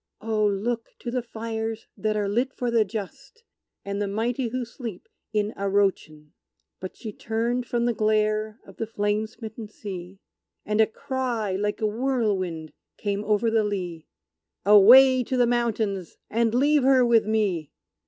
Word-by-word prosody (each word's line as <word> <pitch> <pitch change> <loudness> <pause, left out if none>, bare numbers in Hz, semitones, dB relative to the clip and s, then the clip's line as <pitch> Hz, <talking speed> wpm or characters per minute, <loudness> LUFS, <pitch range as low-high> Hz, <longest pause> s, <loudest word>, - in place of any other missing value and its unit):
Oh, 220 -1 0
look 225 +4 -2
to 240 - -4
the 250 0 -1
fires 225 -1 -5
that 215 0 -1
are 205 -1 0
lit 245 +7 -1
for 245 -1 -2
the 230 -2 +4
just, 225 - -8 0.4
And 200 +1 -3
the 205 - 0
mighty 230 +5 -1
who 250 +2 -3
sleep 230 -5 -8 0.2
in 210 0 0
Arrochin!" 195 -7 -1 0.5
But 185 - -8
she 215 -2 -7
turned 235 +3 -2
from 235 -1 0
the 240 - +2
glare 215 0 0
of - - -15
the 225 - -3
flame 210 0 -1
smitten 220 0 -9
sea, 190 -3 -8 0.5
And 210 +1 +2
a 220 - +5
cry, 235 -5 -2
like 210 +2 -2
a - - +2
whirlwind, 210 - -1 0.2
came 205 0 -2
over 215 +2 +2
the 220 -1 +3
lea 180 -6 -4 0.6
"Away 250 +6 +8
to 255 +2 -2
the 245 - +5
mountains 220 -6 -1
and 230 +1 +1
leave 290 +3 +4
her 260 -1 +5
with 230 -3 +3
me!" 200 -9 0
220 Hz, 160 wpm, -25 LUFS, 205-235 Hz, 0.6 s, Away